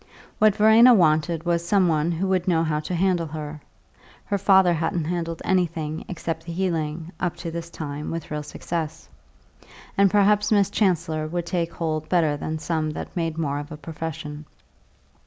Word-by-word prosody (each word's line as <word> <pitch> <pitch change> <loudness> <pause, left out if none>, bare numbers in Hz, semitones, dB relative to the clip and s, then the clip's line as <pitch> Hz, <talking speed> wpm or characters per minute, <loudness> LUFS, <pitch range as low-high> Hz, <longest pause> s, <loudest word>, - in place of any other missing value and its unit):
What 215 -2 +5
Verena 225 +3 +7
wanted 160 -2 +2
was 170 -1 +1
some 185 +1 +3
one 160 0 +1
who 175 +3 -1
would 185 -1 +1
know 165 -3 +3
how 155 -2 0
to 165 +4 -4
handle 175 -2 +1
her 150 -1 -7 0.6
(her 200 - 0
father 190 -2 +5
hadn't 165 +1 -1
handled 165 -1 -3
anything 165 -4 -1
except 165 -2 -4
the 170 - -4
healing, 165 -2 -2
up 175 -1 -1
to 170 -1 -6
this 170 0 -6
time, 150 -2 -6
with 165 -2 -5
real 150 0 -2
success), 160 +1 -5 0.9
and 200 0 +5
perhaps 210 +1 +3
Miss 200 -2 +3
Chancellor 165 -7 0
would 175 +1 -3
take 170 -2 -1
hold 155 -2 -3
better 160 -5 +2
than 155 +2 -4
some 160 -1 -1
that - - -7
made 165 -2 -2
more 145 -3 -1
of 145 +2 -8
a 150 - -6
profession. 155 -1 -6
165 Hz, 175 wpm, -24 LUFS, 155-180 Hz, 0.9 s, Verena